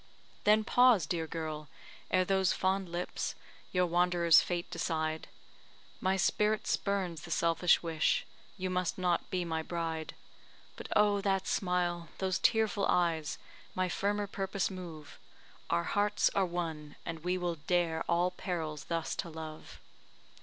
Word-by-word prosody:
Then 215 +1 +5
pause, 245 -6 +5
dear 165 +1 -2
girl! 155 -2 -5 0.4
ere 185 0 +3
those 190 0 +2
fond 190 -1 0
lips 175 +1 -3 0.4
Your 180 -1 +3
wanderer's 175 -1 +5
fate 175 -1 -2
decide; 160 -1 -2 0.7
My 190 +1 +1
spirit 210 +3 +2
spurns 190 -5 -1
the - - -10
selfish 170 +2 +3
wish 160 -2 +1 0.3
You 185 -1 -2
must 180 -1 -1
not 180 -2 0
be 180 -1 -1
my 160 -1 -1
bride. 165 -1 -4 0.6
But - - -8
oh, 205 -1 +4
that 195 -1 +1
smile 175 -3 0
those 190 -1 0
tearful 220 -3 +2
eyes, 165 -4 +1 0.4
My 185 0 0
firmer 205 +3 0
purpose 195 -1 -2
move 165 -5 -9 0.5
Our 85 - +2
hearts 205 +1 +2
are 195 -2 +2
one, 160 -4 -4
and 165 -1 -4
we 180 +3 -1
will 175 -2 -2
dare 170 -3 +1
All 175 +1 +3
perils 160 -5 -4
thus 165 -1 -2
to 170 - -3
love! 155 -1 -8
175 Hz, 140 wpm, -32 LUFS, 165-190 Hz, 0.7 s, Then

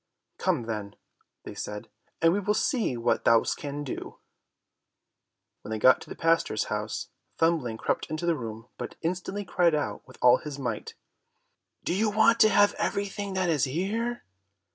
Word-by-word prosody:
"Come 170 -10 +1
then," 105 -3 -5 0.5
they - - -8
said, 105 0 -6 0.4
"and 165 0 +6
we 200 - +1
will 205 +1 0
see 220 - 0
what 115 - +1
thou 115 -1 +5
canst 145 0 -4
do." 130 - -6 1.4
When - - -10
they 110 - -2
got 130 +4 +5
to - - -11
the - - -6
pastor's 165 -9 +2
house, - - -3 0.3
Thumbling 160 -9 +1
crept - - -1
into 155 +2 -3
the 170 -1 +2
room, 115 -3 -7
but - - -6
instantly 185 +4 -2
cried 175 -3 +3
out 150 - -2
with 130 - -15
all 125 0 +6
his 150 -2 -7
might, 120 -6 -4 0.9
"Do - - -1
you 215 +4 +2
want 225 +2 +4
to 215 - +7
have 205 -1 +5
everything 200 0 -2
that 185 -2 +1
is 150 -5 +2
here?" 210 - -2
165 Hz, 165 wpm, -27 LUFS, 125-200 Hz, 1.4 s, to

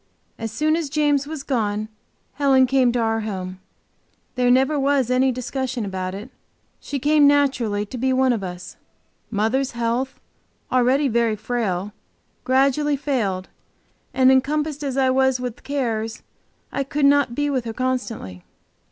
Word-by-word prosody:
As 225 -1 -4
soon 305 +8 +1
as 325 -3 -2
James 290 -1 +1
was 305 -2 -6
gone 215 -6 -1 0.5
Helen 270 -2 +4
came 255 -1 +3
to 245 - -1
our 225 -1 +1
home; 185 -4 -5 0.7
there 250 -1 +1
was 270 0 +2
never - - +4
any 260 +1 +3
discussion 255 -1 -3
about 185 -1 -4
it, 215 +6 -9 0.5
she 285 - -4
came 295 +2 +4
naturally 260 -8 +2
to 245 +4 -7
be 260 +2 +1
one 260 -1 +3
of 215 -4 -3
us. 180 -1 -7 0.5
Mother's 230 +5 0
health, 235 +3 -2 0.5
already 255 +3 +3
very 230 -2 +1
frail, 210 -4 -2 0.5
gradually 275 +3 +2
failed, 210 -10 -2 0.6
and 260 0 +4
encompassed 295 +3 +1
as 275 -2 -3
I 260 -1 +3
was 265 -1 +2
with 250 -2 -5
cares, 225 -6 -3 0.5
I 275 - -1
could 280 +1 0
not 280 -4 +3
be 290 +1 0
with 255 -3 -1
her 225 - -4
constantly. 240 - -3
255 Hz, 150 wpm, -22 LUFS, 225-275 Hz, 0.7 s, Helen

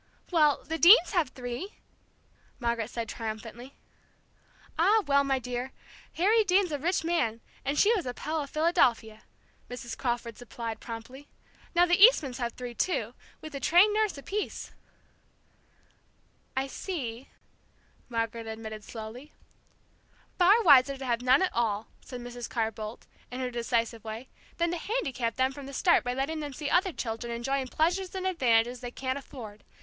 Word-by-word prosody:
"Well, 305 -5 +3
the 325 +1 -4
Deanes 360 +1 +8
have 345 -9 +1
three!" 250 - -6 0.8
Margaret 235 -2 -1
said 230 -1 -4
triumphantly. 225 +4 -7 1.0
"Ah, 410 +6 +4
well, 280 -1 +4
my 270 -1 +1
dear! 250 +1 -4 0.4
Harry 430 +6 +3
Deane's 375 -2 +2
a 290 - -2
rich 345 +4 0
man, 320 -10 0 0.2
and 280 +2 -1
she 425 +7 +5
was 370 - -1
a 250 - -3
Pell 310 +1 -2
of 280 - -6
Philadelphia," 240 -9 +1 0.5
Mrs. 240 -1 -6
Crawford 235 -2 -3
supplied 230 -2 -6
promptly. 245 +5 -9 0.5
"Now 350 +1 +6
the 350 +2 +4
Eastmans 285 - +5
have 235 -2 -2
three, 245 -1 -7
too, 235 - -1 0.3
with 310 -1 -9
a 275 - -4
trained 360 +8 +5
nurse 430 -6 +1
apiece." 400 +9 -4 1.8
"I 265 - +1
see," 270 - -5 0.8
Margaret 230 -1 -3
admitted 220 -1 -7
slowly. 230 +7 -9 1.1
"Far 400 +6 +6
wiser 275 -4 +6
to 265 - -7
have 240 -1 0
none 255 +7 +4
at 375 - 0
all," 225 -2 -1
said 250 -2 -8
Mrs. 245 0 -7
Carr 225 -1 -1
Boldt, 215 +1 -8 0.2
in 250 - -6
her 255 -1 -2
decisive 230 -1 -1
way, 225 +3 -7 0.3
"than 340 0 +1
to 350 - -2
handicap 265 - -2
them 260 0 +2
from 275 0 -9
the 275 - -9
start 345 +6 +3
by 245 0 -2
letting 285 +4 -2
them 295 -2 -5
see 290 +2 -4
other 370 +1 +3
children 235 -4 -4
enjoying 260 +3 -2
pleasures 355 +7 0
and 375 0 -3
advantages 245 -8 +2
they 245 - -5
can't 260 +2 -3
afford. 220 -7 -11
260 Hz, 160 wpm, -28 LUFS, 235-330 Hz, 1.8 s, Deanes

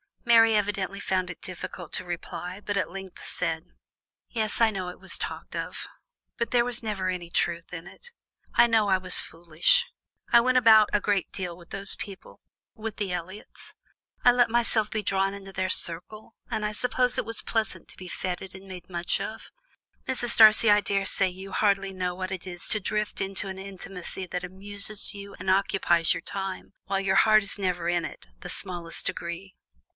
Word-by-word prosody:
Mary 225 -1 +6
evidently 200 -1 -1
found 185 -2 -1
it 180 - -8
difficult 180 -2 -7
to - - -3
reply, 175 +1 -5
but 205 -1 -2
at 200 - 0
length 190 0 -9
said: 165 -1 0 0.6
"Yes, 220 -3 -2
I 225 -1 +6
know 190 -3 -4
it 180 - -10
was - - -6
talked - - -6
of, - - -4 0.5
but 235 - -2
there 240 -1 +4
was 245 -1 +3
never 205 -4 -2
any 175 -2 -4
truth 170 0 -1
in 170 -1 -6
it. 195 - -14 0.5
I - - +7
know 225 -3 +3
I 190 -1 +4
was 185 0 +6
foolish. 170 - +2 0.5
I 235 - +8
went 255 +2 +3
about 220 -3 +7
a 210 - +3
great 200 -3 0
deal 180 -3 -4
with 170 -1 -16
those 195 0 -1
people 195 -3 -8 0.3
with 220 -1 -6
the 200 -3 -2
Elliots; 180 +4 -7 0.5
I 245 - +8
let 245 -1 +4
myself 225 -2 +2
be 215 -1 -2
drawn 195 0 +1
into 195 -1 -9
their 185 0 -1
circle, 185 +7 -2
and 220 -3 -1
I 210 - 0
suppose 250 +3 0
it - - 0
was 230 +1 -1
pleasant 225 -3 -2
to - - -14
be 185 -1 -9
fêted 185 +1 -4
and 190 0 -12
made 185 -1 -9
much 175 0 -1
of; 220 - -6 0.6
Mrs. 240 -2 -2
Darcy, 220 0 +8
I 205 0 +6
daresay 195 -1 +1
you 190 +2 -9
hardly 195 -2 +1
know 180 -1 -2
what 185 +1 -4
it 190 0 -5
is 175 -1 -6
to 215 - +1
drift 210 +1 -2
into 195 0 -2
an 190 0 -6
intimacy 190 -1 -7
that 180 0 -4
amuses 200 +3 -1
you, 200 0 -9
and 190 - -3
occupies 185 -3 +3
your - - -4
time, 195 0 -5
while 195 0 0
your 195 0 +2
heart 215 -1 +6
is 200 - -1
never 180 -3 -1
in 175 -1 +1
it - - -9
the - - -8
smallest 175 -3 -5
degree." 175 +3 -4
195 Hz, 190 wpm, -27 LUFS, 180-215 Hz, 0.6 s, I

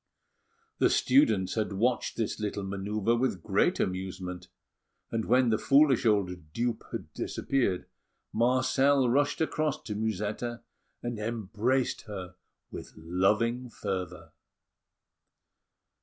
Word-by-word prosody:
The - - +5
students 110 -9 +3
had 110 -2 -1
watched 120 +5 0
this 110 -1 -2
little 105 -1 -3
manœuvre 100 +4 -1
with 110 -9 -1
great - - +2
amusement; 90 -1 -3 0.6
and 115 -1 -1
when 125 0 +4
the 110 - +2
foolish 140 -4 +4
old 90 -7 0
dupe 120 -1 -1
had - - -6
disappeared, 120 -10 -1 0.5
Marcel 130 +3 +3
rushed 145 +5 +2
across 155 -2 0
to 105 - -4
Musetta, 110 +3 -3 0.4
and 120 -2 -3
embraced 115 +3 -1
her 95 -3 -6 0.4
with - - -8
loving 105 +9 +1
fervour. 90 -6 -5
110 Hz, 110 wpm, -29 LUFS, 95-125 Hz, 0.6 s, The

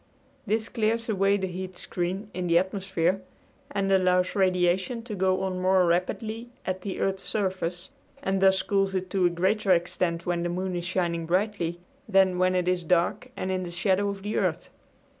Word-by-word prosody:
This 220 +2 0
clears 230 0 0
away 200 -1 +3
the 190 - -2
heat 185 0 -6
screen 190 +4 -3
in 180 -1 -3
the 170 0 +4
atmosphere 190 -1 0 0.5
and 195 -1 -1
allows 185 -1 +3
radiation 185 +4 +1
to 230 -2 -6
go 190 -1 +1
on 185 -1 -2
more 185 0 +4
rapidly 215 +7 -1 0.2
at 185 0 -2
the 195 0 -5
earth's 195 0 0
surface, 185 -3 -2 0.3
and 190 0 0
thus 190 0 +4
cools 195 -1 +1
it 185 -1 -3
to 185 -2 +3
a - - +2
greater 190 +4 0
extent 175 -1 +1
when 175 -1 0
the 175 - -1
moon 185 +1 -2
is 175 0 -3
shining 170 -2 -1
brightly 180 -2 0 0.3
than 190 -2 +4
when 185 0 +3
it 180 -1 +1
is 180 -1 +1
dark 175 +8 +1
and 185 - -2
in 185 0 -1
the 180 - -5
shadow 190 +3 +1
of 200 -1 -6
the 210 +1 -2
earth. - - -1
185 Hz, 185 wpm, -27 LUFS, 180-195 Hz, 0.5 s, the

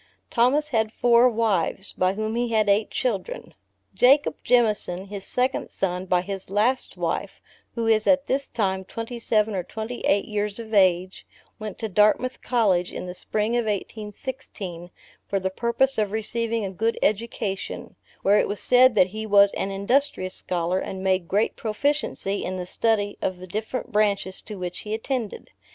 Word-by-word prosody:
Thomas 275 +6 +3
had 220 -5 +1
four 240 +1 +5
wives, 215 -4 0
by 185 +1 +1
whom 215 +1 -2
he 240 0 0
had 215 -2 +2
eight 205 +2 +3
children. 255 - -3 0.4
Jacob 275 +4 +4
Jemison, 210 -6 +2
his 200 -2 -6
second 255 +5 -1
son 185 -1 -2
by 180 -1 +3
his 195 0 -6
last 220 +7 +1
wife, - - -3 0.4
who 230 -1 -1
is 220 -1 +3
at 280 -1 +4
this 275 +1 -1
time 190 -4 -1
twenty 230 +5 -6
seven 215 -1 +1
or 190 - -1
twenty 220 +6 -6
eight 200 0 +3
years 210 -1 -2
of 225 -1 -8
age, 185 -2 +2 0.3
went 215 -2 -6
to 225 - -3
Dartmouth 210 +5 +2
college, 195 -8 +1
in - - -6
the 180 - -6
spring 215 +5 -1
of 240 -1 +1
1816, 210 -3 -5 0.4
for 195 - 0
the 190 0 -2
purpose 235 +5 +1
of 210 -2 0
receiving 230 0 -1
a 190 - -4
good 225 +5 -1
education, 210 -2 -2 0.3
where 200 +2 +5
it - - +1
was 205 - -4
said 250 -1 +5
that 185 -2 +5
he 220 +2 -5
was 200 -1 +6
an 195 - -2
industrious 200 -1 0
scholar, 180 +1 -1
and 190 0 -5
made 185 -2 +1
great 205 +5 +1
proficiency 220 -3 -1
in 185 0 -3
the 180 - -4
study 205 +1 0
of 185 - -1
the 180 - -9
different 215 +7 -4
branches 200 -3 0
to 215 - -8
which 180 -2 -5
he 215 0 -3
attended. 230 -1 -4
210 Hz, 170 wpm, -24 LUFS, 190-235 Hz, 0.4 s, was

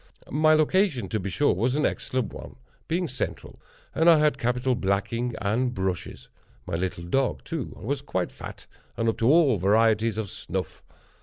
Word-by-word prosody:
My 155 +2 +4
location, 155 - +2
to 110 - -1
be 100 +1 -4
sure, 145 +9 +2
was 120 +8 0
an 150 - +1
excellent 130 -2 -2
one, - - -9 0.3
being 175 +2 0
central, 130 -2 -5 0.3
and 165 +2 +4
I 165 - +8
had 150 -3 +2
capital 125 +2 +1
blacking 115 +2 -1
and 120 +5 0
brushes. 95 -3 -3 0.4
My 90 - -7
little 85 0 -2
dog, 130 +10 0
too, 160 -6 -5
was 135 +3 -2
quite 95 -10 -2
fat - - -10 0.3
and 115 - 0
up 115 - 0
to 115 - +3
all 150 -8 +5
varieties 110 +3 +3
of 105 -4 -3
snuff. - - -5
120 Hz, 170 wpm, -26 LUFS, 105-145 Hz, 0.4 s, I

